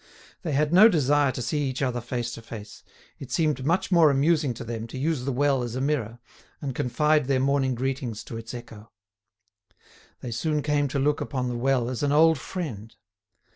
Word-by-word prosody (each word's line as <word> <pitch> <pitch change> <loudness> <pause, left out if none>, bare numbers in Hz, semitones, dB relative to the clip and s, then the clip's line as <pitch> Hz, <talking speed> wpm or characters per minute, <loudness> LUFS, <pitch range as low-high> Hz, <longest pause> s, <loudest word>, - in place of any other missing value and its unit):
They 160 -6 -3
had 150 +3 +1
no 210 +5 +8
desire 145 - +2
to 125 - -5
see 145 +3 -1
each 130 +2 -3
other 125 -2 -1
face 120 0 -3
to 115 - -8
face: 110 -2 -10 0.4
it 135 -2 -9
seemed 150 -3 0
much 170 +7 0
more 170 -4 +6
amusing 145 +1 +2
to 120 - -7
them 115 0 -5
to 115 - -8
use 145 -2 -1
the 135 - 0
well 135 0 +2
as 120 -1 -4
a - - -2
mirror, 130 -5 -1 0.4
and 135 -2 -4
confide 150 +4 +1
their 135 -2 +2
morning 135 -1 +1
greetings 130 -3 -3
to - - -8
its 115 0 -7
echo. 115 -2 -11 1.3
They 120 - -5
soon 150 +6 -1
came 145 -1 +1
to 140 - -3
look 145 +2 +1
upon 130 -3 -2
the 120 - -3
well 125 0 +1
as 125 -1 -4
an 145 -1 +1
old 160 0 +5
friend. 115 - -6
135 Hz, 200 wpm, -26 LUFS, 120-150 Hz, 1.3 s, no